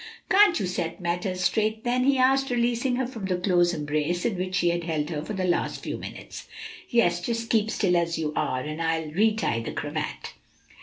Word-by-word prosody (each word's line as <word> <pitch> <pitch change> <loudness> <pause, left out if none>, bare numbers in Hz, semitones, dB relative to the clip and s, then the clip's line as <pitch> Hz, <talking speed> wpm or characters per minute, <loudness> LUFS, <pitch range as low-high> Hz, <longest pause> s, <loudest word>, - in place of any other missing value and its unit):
"Can't 385 -3 +6
you - - -1
set 175 -1 -3
matters 180 +1 -2
straight, 220 +4 +1
then?" 250 0 +1
he 275 0 +4
asked, 270 +1 +3
releasing 245 +1 +1
her 260 +1 0
from 230 -5 -6
the 185 -1 0
close 180 -1 +3
embrace 155 +2 -1
in 230 - +1
which 185 +1 -2
he 175 - +3
had 170 0 -1
held 155 -1 -2
her 150 -2 -2
for 215 - -5
the 190 -2 -1
last 175 -1 -1
few - - -3
minutes. - - -9 0.4
"Yes; 175 -7 +2
just 230 +4 -3
keep 220 -1 +2
still 185 -5 +1
as 170 -1 +1
you 155 -2 -2
are, 130 - 0
and 155 +4 -5
I'll 160 -1 -1
re 215 +7 +3
tie 115 - 0
the 115 - -5
cravat." - - -4
185 Hz, 210 wpm, -26 LUFS, 170-230 Hz, 0.4 s, Can't